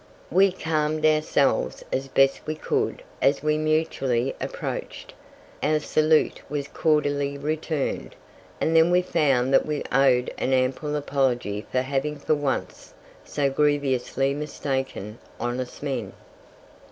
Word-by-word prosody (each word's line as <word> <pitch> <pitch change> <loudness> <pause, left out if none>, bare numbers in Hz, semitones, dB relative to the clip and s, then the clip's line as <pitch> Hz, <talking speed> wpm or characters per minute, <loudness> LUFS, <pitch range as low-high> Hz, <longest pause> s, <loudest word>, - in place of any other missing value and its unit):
We 190 +3 +5
calmed 155 -3 -1
ourselves 155 -2 +2
as 135 +1 -1
best 135 0 +2
we 155 - -2
could 425 - -1 0.2
as 140 - +2
we 150 0 +1
mutually 135 -5 0
approached; - - -5 0.5
our 155 +1 +2
salute 155 +1 +2
was 145 -1 -3
cordially 145 -3 0
returned, 155 0 -2 0.4
and 160 - +1
then 165 +1 +6
we 180 +1 +3
found 135 -7 +2
that - - +4
we 150 -1 -2
owed 130 -2 +3
an 130 - 0
ample 130 +4 0
apology 125 -7 -1
for 130 - +2
having 140 +3 -1
for 155 - 0
once 145 -3 -3 0.3
so 140 -2 -1
grievously 135 -2 +1
mistaken 135 -7 -4 0.2
honest 125 +3 -4
men. 125 -9 -3
145 Hz, 125 wpm, -25 LUFS, 135-155 Hz, 0.5 s, then